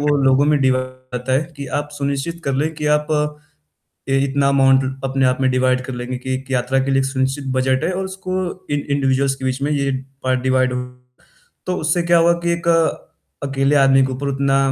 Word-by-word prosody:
वो 145 0 +2
लोगों 135 +1 +4
में 150 -1 +3
डिवाइड 130 -1 +2 0.3
होता 125 +1 -2
है 135 +4 +3
कि 140 - -6
आप 145 0 -4
सुनिश्चित 140 +4 -3
कर 140 - 0
लें 155 +4 0
कि 150 0 -4
आप 150 0 -4 1.0
ए 135 0 +2
इतना 140 0 +1
अमाउंट 135 -1 +4
ल 130 - -3
अपने 135 0 +1
आप 130 +1 +1
में 130 - +2
डिवाइड 130 0 +2
कर 130 - -5
लेंगे 125 +1 -4
कि 130 +1 -3
एक 130 +1 -6
यात्रा 130 +1 +1
के 135 - -2
लिए 135 - +3
एक 135 - 0
सुनिश्चित 135 +1 -1
बजट 130 +3 +1
है 180 - 0
और 190 +1 -2
उसको 190 0 -4 0.3
इंडिविजुअल्स 140 -1 0
के 135 - -9
बीच 130 +1 -1
में 145 - 0
ये 140 -1 0 0.5
डिवाइड 130 -1 +2
हो 125 - -2 0.9
तो 180 0 -1
उससे 160 +3 0
क्या 170 0 +4
हुआ 170 +1 +5
कि 170 - +1
एक 170 0 -3 0.8
अकेले 135 +1 +1
आदमी 135 -1 +5
के 130 - -4
ऊपर 140 +2 -3
उतना 135 0 +1
135 Hz, 210 wpm, -19 LUFS, 130-145 Hz, 1.0 s, हुआ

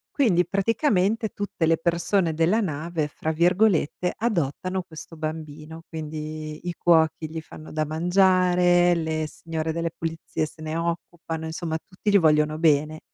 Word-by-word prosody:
Quindi, 190 - +3
praticamente, 215 0 +1
tutte 200 -6 -3
le 165 0 +3
persone 170 0 +1
della 170 +8 +2
nave, 160 -3 -2
fra 155 +1 -3
virgolette, 180 0 +2
"adottano 185 - -1
questo 165 -1 -11
bambino". 155 0 -6
Quindi 155 0 -6
i 175 - -2
cuochi 160 -2 +2
gli 160 0 -4
fanno 155 0 -12
da 155 0 -1
mangiare, 175 +1 +3
le 160 -1 -1
signore 160 0 -4
delle 165 0 -2
pulizie 165 -1 -3
se 155 +1 -13
ne 155 +1 -3
occupano, 165 -1 -4
insomma, 160 0 -3
tutti 195 +5 -4
gli 200 - +6
vogliono 155 -1 +3
bene. 155 -1 +2
165 Hz, 140 wpm, -25 LUFS, 155-180 Hz, -, gli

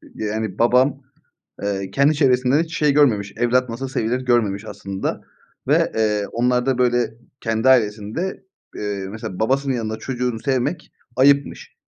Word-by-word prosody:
yani 110 -2 -3
babam, 130 +4 +3 0.6
eee, 100 -1 -2
kendi 140 +5 +3
çevresinden 130 +1 +3
hiç 165 0 -6
şey 150 -2 +3
görmemiş, 105 -9 +2
evlat 125 +1 +2
nasıl 130 +4 -4
sevilir 125 0 -1
görmemiş 110 -5 +1
aslında 95 -2 -5 0.5
ve, - - +3
eee, 105 -2 +1
onlarda, 125 +2 +1
böyle, 120 -2 +1 0.3
kendi 115 +2 +1
ailesinde, 115 - 0 0.3
eee, 100 -2 -4
mesela 105 -4 -7
babasının 135 +4 +1
yanında 110 -2 -3
çocuğunu 125 -1 -3
sevmek 135 +5 -2 0.2
ayıpmış. 140 +2 +2
120 Hz, 130 wpm, -21 LUFS, 110-135 Hz, 0.6 s, babam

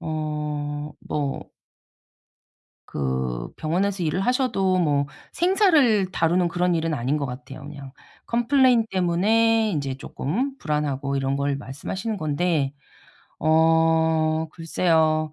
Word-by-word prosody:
어 150 -2 -3 0.4
뭐 145 -2 -3 1.4
그 65 -3 -3
병원에서 185 +4 -1
일을 165 +3 0
하셔도 195 -6 +1
뭐 145 -4 +1 0.3
생사를 320 - +3
다루는 175 0 +1
그런 175 +1 0
일은 165 -1 -1
아닌 130 +2 -1
것 145 - -2
같아요. 125 +1 -8
그냥 140 -3 -10 0.3
컴플레인 240 0 +3
때문에 215 +5 +2
이제 140 -5 -2
쪼끔 230 - -3
불안하고 145 -2 -2
이런 135 0 0
걸 140 0 0
말씀하시는 190 - -5
건데 155 -3 0 0.7
어 160 0 +3
글쎄요. 160 -2 +1
160 Hz, 235 characters per minute, -24 LUFS, 145-190 Hz, 1.4 s, 생사를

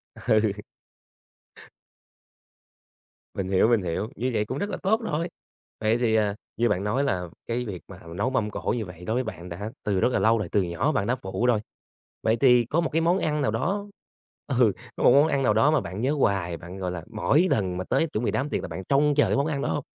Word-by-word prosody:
Ừ. 110 -1 +2 2.8
Mình 95 - -3
hiểu, 95 +2 +4
mình 115 -3 +3
hiểu, 90 +5 -2
như 125 +2 -1
vậy 105 -1 +1
cũng - - -4
rất 205 - -2
là - - -3
tốt 220 +4 +2
rồi! 165 +4 -2 0.5
Vậy 110 +1 +2
thì, 115 -2 +1
à, 105 -2 +2 0.2
như 120 +1 +2
bạn 95 - 0
nói 120 +7 0
là 90 -10 -1 0.2
cái 120 +1 -2
việc 95 -6 -6
mà - - -11 0.2
nấu 105 +7 0
mâm 115 -5 0
cỗ - - -2
như 110 - -3
vậy 90 -1 -11
đối 110 - -1
với 125 +2 +1
bạn 90 -6 -7
đã 100 +6 -5
từ 100 -3 0
rất 120 - +3
là - - +1
lâu 115 +1 +4
rồi, 100 -5 -3
từ 100 - +3
nhỏ 90 - 0
bạn 135 -9 0
đã 125 - +2
phụ 115 0 -3
rồi, 120 -3 +3 0.6
vậy 110 +1 +2
thì 125 -2 +5
có 155 +8 +1
một 165 - -1
cái 165 - +1
món 170 +3 +3
ăn 150 -1 0
nào 110 - +1
đó 200 - -1 0.6
ừ, 125 -5 +3 0.2
có - - -3
một - - +7
món 145 +4 +6
ăn 140 -3 0
nào 110 - +3
đó 115 +8 +4
mà 155 - +2
bạn 95 +5 -6
nhớ 135 +4 +1
hoài, 95 - 0
bạn, 90 +3 -10
gọi 90 -2 -3
là, 90 -2 -5
mỗi 145 +10 +2
lần 95 -4 0
mà 90 - -2
tới 135 - +1
chuẩn 120 -5 -3
bị - - +1
đám 140 +2 -1
tiệc - - -1
là - - -5
bạn 95 - -6
trông 145 +1 +4
chờ 145 - +4
cái - - +1
món 140 - +2
ăn 145 -3 -2
đó - - -1
hông? 145 - -1
115 Hz, 245 wpm, -26 LUFS, 100-140 Hz, 2.8 s, một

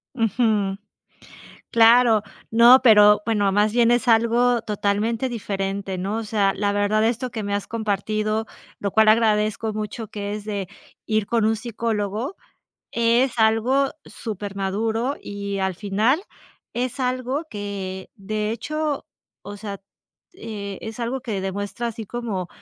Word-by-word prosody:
Ujú, 215 -4 +1 0.9
claro, 230 -1 +6 0.3
no, 240 +3 +8
pero 210 -3 +7
bueno, 210 -3 +1
más 210 +2 +2
bien 235 0 +4
es 240 -1 +2
algo 235 +1 +3
totalmente 215 +4 -1
diferente, 195 -3 -3
¿no?, 200 +5 -2
o - - -3
sea, 205 -2 +1
la 200 0 0
verdad, 205 +1 +1
esto 240 +2 -1
que 220 -2 -4
me 200 0 -2
has 205 - -2
compartido, 215 0 -1 0.3
lo 200 - -2
cual 220 +1 +4
agradezco 215 0 +2
mucho 215 +1 -5
que 205 -1 -5
es 210 - -6
de, 200 -3 -4 0.4
ir 215 -2 0
con 230 -2 +1
un 220 0 +2
psicólogo, 225 - -3 0.6
es 235 +2 +2
algo 230 +5 +3
supermaduro 215 +4 -3
y 200 -1 -5
al 190 -1 -1
final 215 - +1 0.5
es 250 +2 -3
algo 255 +4 -1
que 195 -3 -5
de 210 +1 -3
hecho 300 +5 -3 0.4
o 205 0 -8
sea, 200 -2 -6 0.5
eh, 205 - -6
es 220 +1 -7
algo 240 +2 -2
que 220 -6 -3
demuestra 205 +5 -3
así 225 -1 -6
como, 220 -7 -4
215 Hz, 140 wpm, -23 LUFS, 205-235 Hz, 0.9 s, no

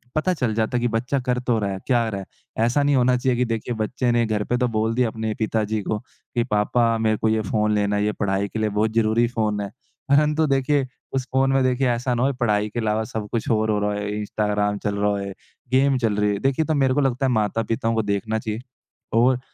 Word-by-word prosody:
पता 180 +4 +1
चल 125 -9 -1
जाता 110 +2 0
है 120 - -1
कि 120 - +2
बच्चा 125 +5 -1
कर 125 0 0
तो 120 -2 0
रहा 100 -1 -1
है, 95 - -4
क्या 120 -3 +3
कर 110 - -3
रहा 100 - -3
है, 110 +3 -5
ऐसा 135 +5 +2
नहीं 145 -1 +3
होना 125 0 +3
चाहिए 125 -1 0
कि 125 - +2
देखिए 115 +1 -3
बच्चे 120 +3 -1
ने 120 0 +3
घर 105 -1 -1
पे 125 - 0
तो 125 - +1
बोल 110 0 0
दिया 125 -2 +2
अपने 110 -1 -3
पिताजी 110 -1 0
को 105 - -2
कि 120 -1 -5
पापा 115 +2 +2
मेरे 110 -1 +1
को 110 - +1
ये 110 0 +1
फ़ोन 105 +1 0
लेना 105 0 +1
है, 105 - +1
ये 105 - +1
पढ़ाई 100 0 -1
के 110 - -4
लिए 110 -1 +1
बहुत 105 +2 0
ज़रूरी 115 +1 +3
फ़ोन 110 -3 -1
है। 100 - -4 0.4
परन्तु 150 +2 +3
देखिए 135 0 +1 0.3
उस 130 -1 -1
फ़ोन 135 0 +3
में 135 -1 +3
देखिए 130 +1 +1
ऐसा 125 +1 0
ना 120 - 0
होए, 140 +1 +2
पढ़ाई 105 -4 0
के 120 - -4
अलावा 110 0 0
सब 110 -2 -3
कुछ 115 - -2
और 110 -1 +1
हो 105 - +1
रहा 105 0 0
है, 105 0 -3
इंस्टाग्राम 105 0 -1
चल 100 0 0
रहा 105 0 +1
है, 100 0 -4 0.4
गेम 135 +1 +3
चल 115 -4 0
रही 105 0 +2
है, 100 - -3
देखिए 135 +6 +1
तो 155 - 0
मेरे 135 -2 +3
को 145 - +2
लगता 135 0 +1
है 130 - +1
माता-पिता 115 +1 0
को 110 - +2
देखना 105 +2 -1
चाहिए। 110 0 -4 0.5
और 125 +2 +4
115 Hz, 255 wpm, -23 LUFS, 105-125 Hz, 0.5 s, और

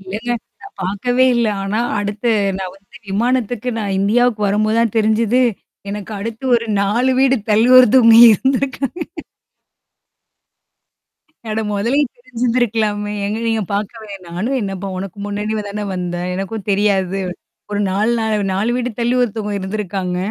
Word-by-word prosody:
இல்லங்க. 230 +3 -3 0.3
நான் 400 - -12
பார்க்கவே 245 +7 +1
இல்ல. 235 -1 +2 0.2
ஆனா 205 +3 -1 0.2
அடுத்து 205 +3 -1 0.3
நான் 185 -1 -5
வந்து 195 0 -21
விமானத்துக்கு 245 +2 0
நான் 200 -3 -2
இந்தியாவுக்கு 220 +2 +2
வரும்போது 215 +2 +1
தான் 230 -3 +1
தெரிஞ்சுது. 220 +3 +2 0.5
எனக்கு 205 +1 -6
அடுத்து 225 +4 -6
ஒரு 230 -1 -1 0.2
4 235 +6 +1
வீடு 270 0 +4 0.2
தள்ளி 220 +4 +4
ஒருத்தவங்க 245 -2 +7 0.2
இருந்திருக்காங்க. 270 - -1 2.5
அட 215 +1 -1
முதலயே 235 +8 +1
தெரிஞ்சுந்திருக்கலாமே. 230 -4 -1
எங்க 210 +2 -2
நீங்க 225 -1 +1
பார்க்கவேன். 205 0 -5
நானும் 210 +11 -2
என்னப்பா 195 -1 -4
உனக்கு 190 0 -6
முன்னாடி 210 +1 -3
தானே 210 +1 -4
வந்தேன். 175 0 -3
எனக்கும் 195 +2 -5
தெரியாது. 195 -1 +1 0.5
ஒரு 205 - -1
நாலு 205 +5 +1
நால 220 -1 0 0.2
4 200 +5 0
வீடு 250 0 -1
தள்ளி 240 +1 +1
ஒருத்தவங்க 215 -3 -2
இருந்திருக்காங்க. 190 -2 -3
215 Hz, 130 wpm, -18 LUFS, 200-240 Hz, 2.5 s, ஒருத்தவங்க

